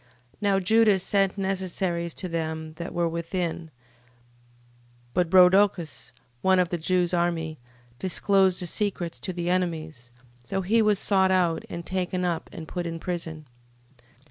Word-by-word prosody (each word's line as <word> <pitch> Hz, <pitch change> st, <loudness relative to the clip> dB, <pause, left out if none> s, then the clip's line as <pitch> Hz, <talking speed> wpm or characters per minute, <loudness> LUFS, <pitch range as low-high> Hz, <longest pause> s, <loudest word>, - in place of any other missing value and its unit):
13:20. -, -, -31 dB, 0.3 s
Now 200 Hz, -2 st, +2 dB
Judas 210 Hz, 0 st, +4 dB
sent 195 Hz, 0 st, +1 dB
necessaries 185 Hz, -3 st, -2 dB
to 185 Hz, -, -4 dB
them 160 Hz, -2 st, -3 dB
that 170 Hz, +1 st, -5 dB
were 170 Hz, -1 st, 0 dB
within 170 Hz, 0 st, -3 dB
13:21. -, -, -30 dB, 1.4 s
But 175 Hz, -2 st, +1 dB
Rhodocus, 180 Hz, -8 st, +4 dB, 0.3 s
one 190 Hz, 0 st, +4 dB
of 180 Hz, -2 st, +2 dB
the 175 Hz, -, -2 dB
Jews' 180 Hz, +2 st, +1 dB
army, 165 Hz, -3 st, -1 dB, 0.4 s
disclosed 190 Hz, +1 st, +2 dB
the -, -, -3 dB
secrets 180 Hz, -2 st, -2 dB
to 190 Hz, -, -4 dB
the 175 Hz, 0 st, -2 dB
enemies, 160 Hz, -8 st, -2 dB, 0.3 s
so 195 Hz, +11 st, -3 dB
he 225 Hz, +5 st, +3 dB
was 210 Hz, -2 st, +3 dB
sought 190 Hz, -1 st, +2 dB
out, 180 Hz, -3 st, +1 dB
and 170 Hz, 0 st, -6 dB
taken 185 Hz, 0 st, -2 dB
up, 170 Hz, -2 st, -2 dB
and 160 Hz, -1 st, -8 dB
put 175 Hz, +1 st, -4 dB
in 165 Hz, 0 st, -4 dB
prison. 165 Hz, -3 st, -5 dB
180 Hz, 150 wpm, -26 LUFS, 165-190 Hz, 1.4 s, Judas